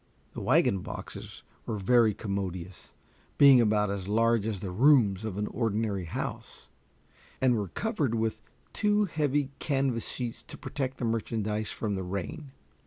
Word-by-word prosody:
The -, -, -6 dB
wagon 95 Hz, -, +3 dB
boxes -, -, -8 dB, 0.2 s
were 110 Hz, -, -2 dB
very 110 Hz, +1 st, +4 dB
commodious, 95 Hz, -4 st, -5 dB, 0.5 s
being 140 Hz, -3 st, +8 dB
about 105 Hz, -2 st, +2 dB
as 95 Hz, -2 st, -4 dB
large 115 Hz, 0 st, +2 dB
as 105 Hz, -4 st, -2 dB
the 95 Hz, -1 st, -5 dB
rooms 110 Hz, -3 st, +4 dB
of 105 Hz, -3 st, -4 dB
an 105 Hz, -, -1 dB
ordinary 105 Hz, -4 st, -1 dB
house, 80 Hz, -, -6 dB, 0.7 s
and 130 Hz, -2 st, +3 dB
were 105 Hz, -3 st, -1 dB
covered 150 Hz, -, -1 dB
with 110 Hz, -1 st, -1 dB, 0.3 s
two 210 Hz, 0 st, +2 dB
heavy 145 Hz, -5 st, 0 dB
canvas 135 Hz, -5 st, 0 dB
sheets 120 Hz, -2 st, -4 dB
to 115 Hz, -, -10 dB
protect 135 Hz, -2 st, -4 dB
the 120 Hz, -, -2 dB
merchandise 110 Hz, -1 st, -1 dB
from 105 Hz, -2 st, -3 dB
the 95 Hz, -, -2 dB
rain. 100 Hz, -, -5 dB
110 Hz, 150 wpm, -29 LUFS, 100-130 Hz, 0.7 s, being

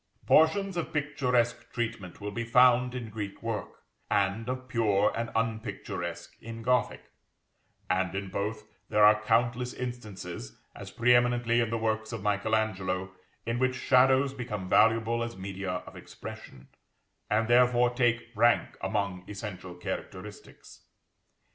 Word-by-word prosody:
Portions 190 Hz, +4 st, +4 dB
of 170 Hz, -, -3 dB
picturesque 125 Hz, -5 st, 0 dB
treatment 110 Hz, -6 st, -4 dB
will 105 Hz, 0 st, -5 dB
be 115 Hz, +3 st, -3 dB
found 125 Hz, +1 st, +4 dB
in 115 Hz, -3 st, -5 dB
Greek 105 Hz, -1 st, -6 dB
work, 115 Hz, -2 st, -5 dB, 0.3 s
and 100 Hz, +4 st, 0 dB
of 130 Hz, 0 st, -4 dB
pure 105 Hz, -4 st, +2 dB
and 115 Hz, 0 st, -2 dB
unpicturesque 95 Hz, -6 st, -4 dB
in 115 Hz, 0 st, -8 dB
Gothic; 125 Hz, +1 st, +1 dB, 0.8 s
and 95 Hz, 0 st, 0 dB
in 95 Hz, 0 st, -3 dB
both 100 Hz, +3 st, -3 dB, 0.3 s
there 105 Hz, 0 st, +5 dB
are 105 Hz, 0 st, +6 dB
countless 120 Hz, +3 st, +1 dB
instances, 100 Hz, -, -7 dB, 0.2 s
as -, -, -8 dB
pre 120 Hz, +1 st, +3 dB
eminently 120 Hz, -1 st, +3 dB
in 115 Hz, -2 st, +1 dB
the 115 Hz, -, -1 dB
works 110 Hz, 0 st, -1 dB
of 115 Hz, -4 st, -5 dB
Michael 105 Hz, +1 st, +1 dB
Angelo, 95 Hz, -4 st, -1 dB, 0.3 s
in 115 Hz, +1 st, -1 dB
which 130 Hz, 0 st, +1 dB
shadows 130 Hz, +1 st, +4 dB
become 110 Hz, -8 st, -5 dB
valuable 115 Hz, +3 st, +3 dB
as 115 Hz, -2 st, -4 dB
media 95 Hz, 0 st, -5 dB, 0.2 s
of -, -, -12 dB
expression, 65 Hz, 0 st, -10 dB, 0.6 s
and 110 Hz, +1 st, +2 dB
therefore 120 Hz, 0 st, +4 dB
take 120 Hz, -1 st, +1 dB
rank 120 Hz, +2 st, +2 dB
among 100 Hz, -4 st, -2 dB
essential 95 Hz, -3 st, -7 dB
characteristics. 90 Hz, -, -8 dB
115 Hz, 135 wpm, -29 LUFS, 100-120 Hz, 0.8 s, are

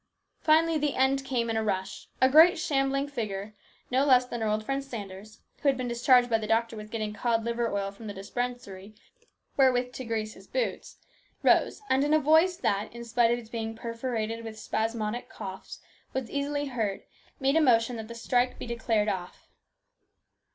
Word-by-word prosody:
Finally 320 Hz, 0 st, +3 dB
the 295 Hz, -2 st, 0 dB
end 270 Hz, +1 st, +2 dB
came 250 Hz, -3 st, -1 dB
in 225 Hz, -, -1 dB
a 220 Hz, -, 0 dB
rush. 190 Hz, -3 st, -3 dB
A 260 Hz, -, +6 dB
great 320 Hz, +7 st, +7 dB
shambling 275 Hz, -4 st, 0 dB
figure, 215 Hz, -6 st, -4 dB, 0.4 s
no 260 Hz, +2 st, +3 dB
less 255 Hz, -3 st, +5 dB
than 240 Hz, -2 st, -5 dB
our 220 Hz, -, 0 dB
old 215 Hz, +1 st, 0 dB
friend 275 Hz, +2 st, -1 dB
Sanders, 210 Hz, -5 st, -9 dB, 0.2 s
who 285 Hz, -, +4 dB
had 270 Hz, -, +1 dB
been 245 Hz, -2 st, -2 dB
charged 245 Hz, +1 st, +5 dB
by 225 Hz, -2 st, +2 dB
the 215 Hz, -, -5 dB
doctor 230 Hz, +1 st, +1 dB
with 215 Hz, 0 st, -8 dB
getting 215 Hz, -2 st, -3 dB
cod 225 Hz, +1 st, 0 dB
liver 235 Hz, 0 st, -1 dB
oil 200 Hz, -1 st, -2 dB
from 215 Hz, +2 st, -11 dB
the 205 Hz, -, -5 dB
dispensary 215 Hz, -1 st, -5 dB, 0.6 s
wherewith 250 Hz, -2 st, +3 dB
to 260 Hz, -, -6 dB
grease 220 Hz, -2 st, -3 dB
his 195 Hz, -, -16 dB
boots, -, -, -3 dB, 0.5 s
rose, -, -, +3 dB
and 265 Hz, -4 st, +2 dB
in 295 Hz, +1 st, +3 dB
a -, -, +5 dB
voice 320 Hz, +5 st, +4 dB
that, 205 Hz, -, -1 dB
in 235 Hz, 0 st, -9 dB
spite 235 Hz, 0 st, +3 dB
of 240 Hz, -, +2 dB
its 225 Hz, -2 st, -11 dB
being 225 Hz, -1 st, -4 dB
perforated 230 Hz, -1 st, -3 dB
with 220 Hz, -1 st, -8 dB
spasmodic 220 Hz, +1 st, -2 dB
coughs, 190 Hz, -3 st, -8 dB, 0.3 s
was 260 Hz, -3 st, -3 dB
easily 285 Hz, +1 st, -1 dB
her.rd, 225 Hz, -7 st, -2 dB, 0.4 s
made 275 Hz, +1 st, +2 dB
a 320 Hz, -, +5 dB
motion 240 Hz, -3 st, +3 dB
that 220 Hz, -1 st, -7 dB
the 235 Hz, -, -8 dB
strike 245 Hz, +2 st, 0 dB
be -, -, -6 dB
declared 225 Hz, -3 st, 0 dB
off. 185 Hz, -3 st, -5 dB
235 Hz, 190 wpm, -28 LUFS, 215-270 Hz, 0.6 s, great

